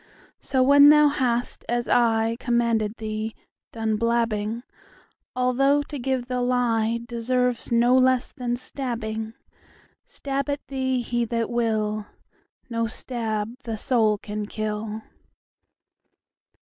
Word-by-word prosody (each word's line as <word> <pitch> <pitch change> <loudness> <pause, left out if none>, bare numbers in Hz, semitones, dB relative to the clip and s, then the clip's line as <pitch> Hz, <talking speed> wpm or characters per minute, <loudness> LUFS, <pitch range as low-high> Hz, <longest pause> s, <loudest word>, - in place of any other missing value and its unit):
So 260 -1 +1
when 285 +2 +8
thou 300 0 +7
hast, 245 -4 -1
as 240 0 0
ICommanded 230 -1 +1
thee, 215 0 -4 0.4
done 220 -1 -1
blabbing,—Although 235 +4 -1
to 290 -1 -7
give 260 0 -1
the 250 0 -2
lieDeserves 240 0 0
no 240 +2 +4
less 255 -1 +3
than 245 -3 -2
stabbing,—Stab 245 +3 -6
at 285 0 -3
thee 260 -2 0
he 240 0 -1
that 230 0 -2
will, 215 -3 -1 0.6
No 230 -2 -1
stab 225 -2 -3
the 225 -2 -4
soul 220 -2 +2
can 210 0 -5
kill. 215 0 -4
235 Hz, 100 wpm, -24 LUFS, 220-255 Hz, 0.6 s, when